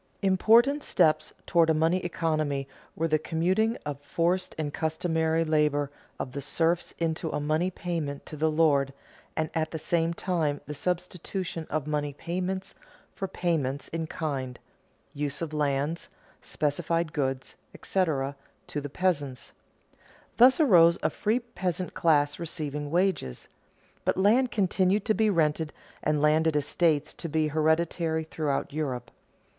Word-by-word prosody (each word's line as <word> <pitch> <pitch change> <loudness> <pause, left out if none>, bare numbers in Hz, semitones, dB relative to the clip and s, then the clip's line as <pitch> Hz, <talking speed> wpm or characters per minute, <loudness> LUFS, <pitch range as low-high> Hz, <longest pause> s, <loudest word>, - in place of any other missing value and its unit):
Important 230 +9 +4
steps 165 - +2
toward 165 -2 +3
a 160 - +4
money 165 +4 +2
economy 155 -5 -1 0.3
were 165 - 0
the 155 -1 +2
commuting 185 +9 +1
of 145 -1 -4
forced 175 +5 0
or 150 -2 -2
customary 160 +1 0
labor 150 -2 +1 0.3
of 130 - -4
the 140 - -5
serfs 165 +4 0
into 165 0 -1
a 150 - -2
money 155 +5 +1
payment 165 -6 -4
to - - -8
the 155 +1 +1
lord, 145 -4 +3 0.4
and 160 0 -1
at 160 -1 0
the 160 - -4
same 165 +1 0
time 160 -6 0
the 150 - -5
substitution 180 +1 -3
of 155 -3 -1
money 150 -1 -1
payments 185 +5 -3 0.4
for 195 - -4
payments 155 -7 -1
in 165 -1 -3
kind 135 -7 -3 0.6
(use 145 -1 -3
of 165 -2 -4
lands, 145 +2 -1 0.3
specified 160 +2 -1
goods, 135 -3 -2 0.2
etc.) 145 -7 0 0.3
to 145 - -4
the 145 - -5
peasants. 145 -7 -1 0.9
Thus 255 +4 +7
arose 175 - +6
a - - +2
free 220 +3 +1
peasant 185 -7 -3
class 145 -3 +2
receiving 150 -3 -4
wages. 175 - 0 0.5
But - - +1
land 225 +7 +4
continued 195 -1 +1
to 220 - +3
be 215 0 +2
rented 160 -3 +1 0.3
and 150 -1 +1
landed 155 +1 +3
estates 150 +1 +1
to 170 - -6
be 155 0 +1
hereditary 160 +1 +1
throughout 150 -3 -2
Europe. 130 -6 -3
160 Hz, 140 wpm, -28 LUFS, 150-175 Hz, 0.9 s, Thus